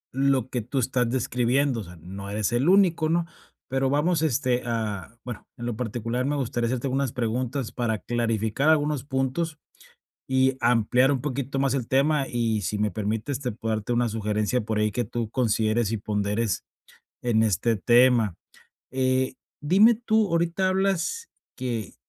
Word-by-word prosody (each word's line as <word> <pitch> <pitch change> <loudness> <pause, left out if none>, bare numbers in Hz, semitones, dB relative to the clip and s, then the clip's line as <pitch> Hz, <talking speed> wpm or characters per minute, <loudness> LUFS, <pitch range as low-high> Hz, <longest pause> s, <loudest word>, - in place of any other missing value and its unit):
lo 135 -2 +2
que 125 - -2
tú 125 +5 -5
estás 125 -1 0
describiendo, 125 +1 +1
o - - -6
sea, 90 -1 -12
no 95 +4 -8
eres 105 +1 -1
el 125 +8 +2
único, 180 -5 +4
¿no? 170 +1 +1 0.4
Pero 135 0 0
vamos, 155 +3 +2
este, 125 -4 +1
ah, 110 -2 -3
bueno, 120 -4 -7
en 120 - -6
lo 120 -2 -2
particular, 120 +1 -2
me 145 +1 0
gustaría 120 -3 -1
hacerte 130 +2 -2
unas 135 -1 0
preguntas 125 +1 -2
para 115 -3 -1
clarificar 115 +4 0
algunos 150 -4 +2
puntos 140 +4 -2 0.7
y 130 0 +2
ampliar 125 +3 +3
un 130 - 0
poquito 135 -1 -3
más 135 -1 +1
el 125 -4 -2
tema 140 +1 +2
y, 115 -3 0
si 105 +3 -2
me 105 0 +1
permites, 110 +7 -2
te 125 -3 -3
puedo 110 +1 -2
darte 110 +3 -3
una 120 0 +1
sugerencia 105 +2 0
por 110 0 -2
ahí 105 0 +1
que 120 - -1
tú 115 0 -3
consideres 110 -2 +1
y 115 - 0
ponderes 105 0 -1 0.6
en 115 -3 +2
este 110 +3 +1
tema, 120 -1 +4 0.6
eh, 130 0 +1 0.3
dime, 200 +10 +5
tú, 220 -2 +1
ahorita 170 +3 +1
hablas 195 - 0 0.3
que 120 -5 -4
125 Hz, 165 wpm, -25 LUFS, 110-140 Hz, 0.7 s, dime